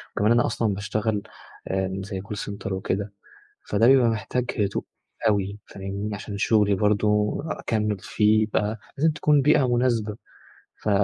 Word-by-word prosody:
وكمان 105 Hz, +3 st, +2 dB
أنا 120 Hz, 0 st, +4 dB
أصلًا 110 Hz, -3 st, 0 dB
باشتغل 105 Hz, +2 st, -1 dB, 0.5 s
آآ 95 Hz, 0 st, -2 dB
زي 95 Hz, -1 st, -5 dB
call 105 Hz, +2 st, -6 dB
center 100 Hz, -1 st, -5 dB
وكده، 95 Hz, +1 st, -2 dB, 0.6 s
فده 105 Hz, +3 st, +3 dB
بيبقى 130 Hz, -2 st, +6 dB
محتاج 115 Hz, +3 st, -1 dB
هدوء 100 Hz, -1 st, 0 dB, 0.4 s
أوي، 100 Hz, 0 st, 0 dB
فاهمني، 100 Hz, +2 st, -5 dB
عشان 100 Hz, 0 st, -6 dB
شغلي 105 Hz, -2 st, +3 dB
برضه 105 Hz, +1 st, +2 dB
أكمِّل 105 Hz, -6 st, -1 dB
فيه 110 Hz, +2 st, +2 dB
بقى 105 Hz, +1 st, 0 dB, 0.2 s
لازم 160 Hz, +3 st, +4 dB
تكون 150 Hz, -1 st, +3 dB
بيئة 145 Hz, -2 st, +4 dB
مناسبة. 115 Hz, -4 st, 0 dB, 0.7 s
ف 105 Hz, -, -1 dB
105 Hz, 140 wpm, -25 LUFS, 100-115 Hz, 0.7 s, بيبقى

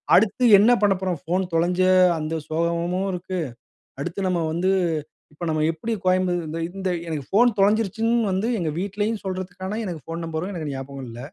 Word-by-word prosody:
அடுத்து 210 Hz, +5 st, +3 dB, 0.2 s
என்ன 215 Hz, +4 st, +5 dB
பண்ண 200 Hz, -1 st, +5 dB
போறோம்? 185 Hz, -4 st, -1 dB
ஃபோன் 180 Hz, +3 st, 0 dB
தொலைஞ்ச 175 Hz, +2 st, +2 dB, 0.4 s
அந்த 155 Hz, +1 st, -3 dB, 0.2 s
சோகமும் 170 Hz, +4 st, 0 dB
இருக்கு. 185 Hz, +1 st, -4 dB, 0.6 s
அடுத்து 175 Hz, +6 st, -4 dB
நம்ம 180 Hz, -2 st, +1 dB
வந்து 180 Hz, +3 st, +1 dB, 0.6 s
இப்போ 150 Hz, +3 st, -7 dB
நம்ம 155 Hz, -1 st, 0 dB
எப்டி 165 Hz, +8 st, -3 dB
கோயம்ப 185 Hz, 0 st, +2 dB
இந்த 155 Hz, +2 st, -4 dB, 0.2 s
இந்த 190 Hz, -1 st, -2 dB, 0.2 s
எனக்கு 155 Hz, -4 st, -3 dB
ஃபோன் 240 Hz, +5 st, +5 dB
தொலைஞ்சுருச்சுன்னு 220 Hz, +3 st, +2 dB
வந்து 190 Hz, +3 st, 0 dB
எங்க 165 Hz, -4 st, -1 dB
வீட்டிலயும் 205 Hz, +4 st, -1 dB
சொல்றதுக்கான 185 Hz, +2 st, -4 dB
எனக்கு 175 Hz, -5 st, -5 dB
ஃபோன் 165 Hz, +3 st, -5 dB
நம்பரும் 165 Hz, +3 st, -3 dB
எனக்கு 160 Hz, -5 st, -4 dB
ஞாபகம் 135 Hz, 0 st, -6 dB
இல்ல. 115 Hz, 0 st, -9 dB
180 Hz, 165 wpm, -23 LUFS, 165-195 Hz, 0.6 s, என்ன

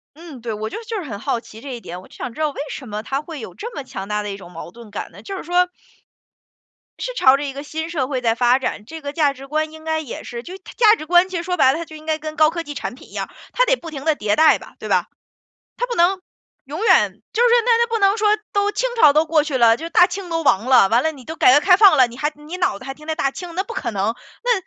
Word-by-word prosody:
嗯， 315 Hz, -7 st, -11 dB
对， 230 Hz, -2 st, -3 dB
我 215 Hz, +1 st, -4 dB
就 -, -, -6 dB
是 -, -, -17 dB
就 435 Hz, -5 st, -3 dB
是 -, -, -8 dB
很 200 Hz, -, -5 dB
好 235 Hz, -, -1 dB
奇 225 Hz, -1 st, -13 dB
这 270 Hz, -3 st, -6 dB
一 235 Hz, -, -7 dB
点， 180 Hz, -1 st, -8 dB
我 -, -, -16 dB
就 -, -, -18 dB
想 240 Hz, -2 st, -6 dB
知 -, -, -9 dB
道 305 Hz, -, +1 dB
为 280 Hz, -, -8 dB
什 265 Hz, -, -7 dB
么 210 Hz, +1 st, -4 dB
它 275 Hz, +5 st, -3 dB
会 310 Hz, -4 st, -8 dB
有 -, -, -9 dB
这 470 Hz, +3 st, -7 dB
么 280 Hz, -, -5 dB
强 195 Hz, -6 st, -7 dB
大 210 Hz, 0 st, -1 dB
的 205 Hz, -, -5 dB
一 195 Hz, -, -5 dB
种 180 Hz, -2 st, -13 dB
矛 165 Hz, +1 st, -8 dB
盾 230 Hz, +1 st, -14 dB
感 -, -, -6 dB
呢， -, -, -14 dB
就 390 Hz, -1 st, -6 dB
是 -, -, -6 dB
说 355 Hz, +2 st, +2 dB, 1.3 s
是 -, -, -3 dB
朝 265 Hz, -, +5 dB
着 290 Hz, -, -4 dB
一 275 Hz, -, -4 dB
个 280 Hz, +1 st, -7 dB
新 320 Hz, +2 st, -5 dB
社 275 Hz, -6 st, -1 dB
会 260 Hz, -3 st, -2 dB
在 230 Hz, -2 st, +1 dB
发 245 Hz, +2 st, +3 dB
展， 210 Hz, -5 st, -4 dB
这 320 Hz, +7 st, -9 dB
个 285 Hz, -1 st, -5 dB
价 295 Hz, -3 st, +2 dB
值 275 Hz, 0 st, -12 dB
观 310 Hz, +2 st, -2 dB
应 315 Hz, 0 st, -12 dB
该 315 Hz, 0 st, -1 dB
也 290 Hz, -6 st, -7 dB
是 235 Hz, 0 st, -7 dB
就 365 Hz, +6 st, -9 dB
它 375 Hz, -, -13 dB
价 440 Hz, -2 st, +6 dB
值 310 Hz, -, -8 dB
观 355 Hz, +2 st, +4 dB
其 370 Hz, -, -5 dB
实 340 Hz, -, -2 dB
说 360 Hz, 0 st, -2 dB
白 265 Hz, -4 st, +5 dB
了， 315 Hz, -, -3 dB
它 335 Hz, -, -4 dB
就 315 Hz, -1 st, -12 dB
应 310 Hz, -, -13 dB
该 315 Hz, 0 st, 0 dB
跟 310 Hz, 0 st, -7 dB
高 310 Hz, 0 st, +5 dB
科 335 Hz, 0 st, -4 dB
技 290 Hz, -2 st, -8 dB
产 245 Hz, -, -5 dB
品 -, -, -15 dB
一 -, -, -19 dB
样， -, -, -4 dB, 0.2 s
它 -, -, +3 dB
得 -, -, +2 dB
不 330 Hz, -6 st, -9 dB
停 280 Hz, -1 st, -7 dB
地 315 Hz, -2 st, +3 dB
迭 210 Hz, 0 st, 0 dB
代 315 Hz, 0 st, +6 dB
吧， -, -, -14 dB
对 -, -, -7 dB
吧？ -, -, +2 dB, 0.7 s
它 -, -, 0 dB
不 475 Hz, -, -3 dB
能 365 Hz, +3 st, +3 dB, 0.5 s
永 300 Hz, +8 st, -6 dB
远 -, -, +3 dB
就 455 Hz, -, +1 dB
是 485 Hz, -, +5 dB, 0.2 s
那 485 Hz, -, +3 dB
那 470 Hz, -, +3 dB
不 455 Hz, 0 st, -1 dB
能 395 Hz, +1 st, +4 dB
说 425 Hz, -1 st, +2 dB, 0.2 s
都 410 Hz, 0 st, +1 dB
清 -, -, -1 dB
朝 305 Hz, -10 st, +7 dB
都 310 Hz, +2 st, +3 dB
过 310 Hz, -1 st, +2 dB
去 290 Hz, -4 st, -2 dB
了， 230 Hz, -2 st, +5 dB
就 325 Hz, -, -7 dB
是 -, -, -5 dB
大 350 Hz, +2 st, +6 dB
清 370 Hz, -1 st, -6 dB
都 330 Hz, -1 st, -1 dB
亡 220 Hz, -4 st, +3 dB
了。 255 Hz, -7 st, +6 dB
完 235 Hz, +5 st, +3 dB
了， 320 Hz, -, +1 dB
你 265 Hz, -5 st, -14 dB
都 320 Hz, -, -6 dB
改 -, -, +5 dB
革 290 Hz, -, +7 dB
开 360 Hz, +4 st, +5 dB
放 385 Hz, -6 st, +6 dB
了， 255 Hz, -, +7 dB
你 235 Hz, -, -12 dB
还 295 Hz, +3 st, -1 dB
你 300 Hz, +4 st, -9 dB
脑 355 Hz, -, 0 dB
子 260 Hz, -, -11 dB
还 270 Hz, -, -5 dB
停 305 Hz, +2 st, -16 dB
着 315 Hz, -, -1 dB
大 275 Hz, -2 st, 0 dB
清， 350 Hz, +2 st, -8 dB
那 380 Hz, -, 0 dB
不 460 Hz, -, -8 dB
可 235 Hz, -, -3 dB
能。 205 Hz, +3 st, -1 dB, 0.3 s
那 485 Hz, -, +3 dB
305 Hz, 340 characters per minute, -20 LUFS, 250-355 Hz, 1.3 s, 朝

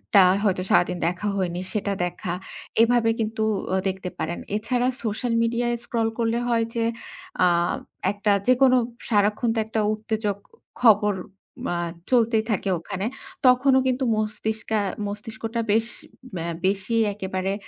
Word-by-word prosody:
টা 195 Hz, -, +9 dB, 0.2 s
হয়তো 190 Hz, -3 st, +1 dB
সারাদিন 175 Hz, 0 st, +3 dB
দেখা 180 Hz, +4 st, -2 dB
হয়নি 180 Hz, -1 st, -1 dB
সেটা 205 Hz, -2 st, -1 dB
দেখা। 175 Hz, 0 st, -4 dB, 0.5 s
এভাবে 235 Hz, -1 st, +3 dB
কিন্তু 220 Hz, 0 st, -1 dB, 0.3 s
আ -, -, +3 dB
দেখতে 190 Hz, -1 st, -4 dB
পারেন। 170 Hz, +2 st, -2 dB, 0.2 s
এছাড়া 245 Hz, +3 st, 0 dB, 0.2 s
সোশ্যাল 230 Hz, +2 st, -1 dB
মিডিয়ায় 240 Hz, +1 st, 0 dB
স্ক্রল 225 Hz, -2 st, 0 dB
করলে 230 Hz, 0 st, +1 dB
হয় 230 Hz, -1 st, +2 dB
যে 230 Hz, -1 st, +1 dB, 0.6 s
আ -, -, +6 dB, 0.6 s
একটা 205 Hz, 0 st, 0 dB, 0.2 s
যেকোনো 255 Hz, 0 st, +5 dB, 0.3 s
সারাক্ষণ 210 Hz, +2 st, +2 dB
তো -, -, +1 dB
একটা 220 Hz, 0 st, -2 dB
উত্তেজক 215 Hz, -2 st, -2 dB, 0.4 s
খবর 210 Hz, -3 st, +5 dB, 0.6 s
আ -, -, -1 dB, 0.3 s
চলতেই 230 Hz, -3 st, +3 dB
থাকে 200 Hz, -1 st, 0 dB
ওখানে। 185 Hz, +4 st, -4 dB, 0.4 s
তখনও 260 Hz, +1 st, +5 dB
কিন্তু 255 Hz, +1 st, 0 dB
মস্তিষ্কে 215 Hz, 0 st, -2 dB, 0.3 s
মস্তিষ্কটা 220 Hz, +2 st, -4 dB
বেশ 225 Hz, +2 st, +3 dB, 0.8 s
বেশি 195 Hz, +3 st, 0 dB, 0.2 s
একেবারে 190 Hz, -1 st, -2 dB
220 Hz, 130 wpm, -24 LUFS, 200-235 Hz, 0.8 s, টা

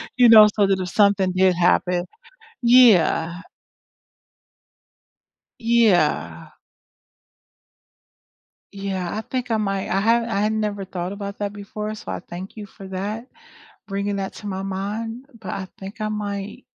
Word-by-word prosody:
you 245 Hz, -2 st, +6 dB
know, 215 Hz, -2 st, +10 dB
so 205 Hz, -2 st, +3 dB
that 195 Hz, -1 st, +1 dB
if 180 Hz, -1 st, -3 dB
something 200 Hz, -2 st, +3 dB
did 185 Hz, 0 st, +3 dB
happen 175 Hz, 0 st, +2 dB, 0.6 s
Yeah. 185 Hz, -8 st, +5 dB, 2.2 s
Yeah. 175 Hz, -, +2 dB, 2.2 s
Yeah, 195 Hz, -3 st, -4 dB
I -, -, -2 dB
think 250 Hz, +1 st, -4 dB
I 225 Hz, -, +2 dB
might 195 Hz, -2 st, -2 dB
I 195 Hz, -, +1 dB
have 230 Hz, +3 st, +3 dB
I 200 Hz, -, -1 dB
had 210 Hz, +1 st, +1 dB
never 210 Hz, -2 st, -2 dB
thought 180 Hz, -1 st, -5 dB
about 200 Hz, 0 st, -6 dB
that 205 Hz, -1 st, -2 dB
before 210 Hz, +1 st, -6 dB
so 215 Hz, -, -10 dB
I -, -, -4 dB
thank 180 Hz, +2 st, -9 dB
you 210 Hz, -2 st, -7 dB
for 195 Hz, -1 st, -12 dB
that, 205 Hz, +5 st, -5 dB, 0.6 s
bringing 200 Hz, 0 st, -2 dB
that 195 Hz, -1 st, -4 dB
to 210 Hz, -, -10 dB
my 190 Hz, -1 st, -4 dB
mind, 215 Hz, +6 st, -4 dB
but 200 Hz, -, -7 dB
I 190 Hz, -, -4 dB
think 195 Hz, +3 st, -9 dB
I 215 Hz, -, -1 dB
might, 205 Hz, -1 st, -5 dB
200 Hz, 145 wpm, -22 LUFS, 190-215 Hz, 2.2 s, know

